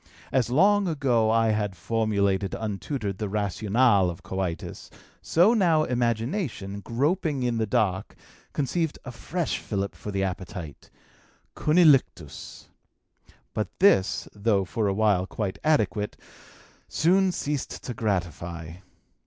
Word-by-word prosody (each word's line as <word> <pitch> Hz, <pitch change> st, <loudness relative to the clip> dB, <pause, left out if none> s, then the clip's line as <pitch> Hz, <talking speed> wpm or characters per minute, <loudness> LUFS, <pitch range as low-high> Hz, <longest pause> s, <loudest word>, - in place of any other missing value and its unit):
As 130 Hz, -3 st, +1 dB
long 200 Hz, +9 st, +4 dB
ago 130 Hz, -8 st, +1 dB
I 115 Hz, 0 st, +3 dB
had 105 Hz, -3 st, -1 dB
formulated 100 Hz, -1 st, 0 dB
untutored 105 Hz, -1 st, -4 dB
the 105 Hz, -2 st, -2 dB
rationale 105 Hz, 0 st, +2 dB
of 85 Hz, +1 st, -8 dB
coitus, 90 Hz, -3 st, -4 dB, 0.3 s
so 180 Hz, +8 st, +4 dB
now 170 Hz, -8 st, +3 dB
imagination, 120 Hz, -, -2 dB
groping 140 Hz, -, -1 dB
in 120 Hz, -2 st, 0 dB
the 110 Hz, -, 0 dB
dark, 95 Hz, -2 st, 0 dB, 0.4 s
conceived 155 Hz, +3 st, -1 dB
a 125 Hz, -, -6 dB
fresh 165 Hz, +7 st, -3 dB
fillip 100 Hz, -2 st, -3 dB
for -, -, -8 dB
the 100 Hz, -1 st, -1 dB
appetite 90 Hz, -4 st, -6 dB, 0.7 s
cunnilinctus. 150 Hz, -, +2 dB, 0.9 s
But 105 Hz, -, -1 dB
this, 140 Hz, -, +3 dB
though 100 Hz, -2 st, +1 dB
for 105 Hz, +3 st, -1 dB
a 100 Hz, -, +1 dB
while 100 Hz, -4 st, +2 dB
quite 100 Hz, -3 st, -4 dB
adequate, 110 Hz, -9 st, +1 dB, 0.7 s
soon 185 Hz, +3 st, +3 dB
ceased 145 Hz, -5 st, -4 dB
to 125 Hz, -, -4 dB
gratify. 85 Hz, -5 st, -3 dB
110 Hz, 120 wpm, -26 LUFS, 95-140 Hz, 0.9 s, long